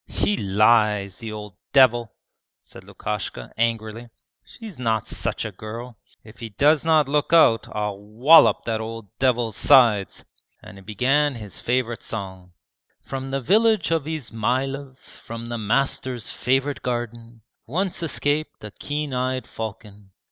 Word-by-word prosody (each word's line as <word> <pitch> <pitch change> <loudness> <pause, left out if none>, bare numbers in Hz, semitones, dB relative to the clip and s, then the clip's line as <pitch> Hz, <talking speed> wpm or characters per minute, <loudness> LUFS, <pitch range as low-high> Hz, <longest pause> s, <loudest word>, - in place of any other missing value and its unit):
'He 205 - 0
lies, 105 - +2
the 115 -2 -7
old 105 -3 -9 0.2
devil!' 120 -5 +4 0.4
said - - -15
Lukashka, 100 - -5
angrily. 115 0 -2 0.3
'She's 215 - -11
not 110 -3 -1
such - - -3
a - - -4
girl. 115 +2 -9 0.2
If 110 +2 -16
he 115 - -6
does 145 +8 +3
not 160 -3 +3
look 145 +1 0
out 115 -10 +5
I'll 105 -2 -3
wallop 115 +10 +5
that 110 -1 -1
old 110 -3 -8
devil's 120 -4 +1
sides,' 115 -9 +4 0.4
and - - -12
he - - -14
began 130 +8 +1
his 105 -4 -8
favourite 120 -1 -1
song: 95 -4 -7 0.5
'From 135 0 -6
the 135 0 -2
village 215 - +3
of 160 -3 0
Izmaylov, 130 -1 -3
From 115 -2 -10
the 120 -1 -3
master's 125 +2 -1
favourite 135 +3 -1
garden, 120 -2 -5 0.2
Once 180 - -2
escaped 155 -3 -2
a 105 - -7
keen 145 +4 -4
eyed 130 0 -1
falcon. 105 -3 -9
120 Hz, 140 wpm, -23 LUFS, 110-135 Hz, 0.5 s, out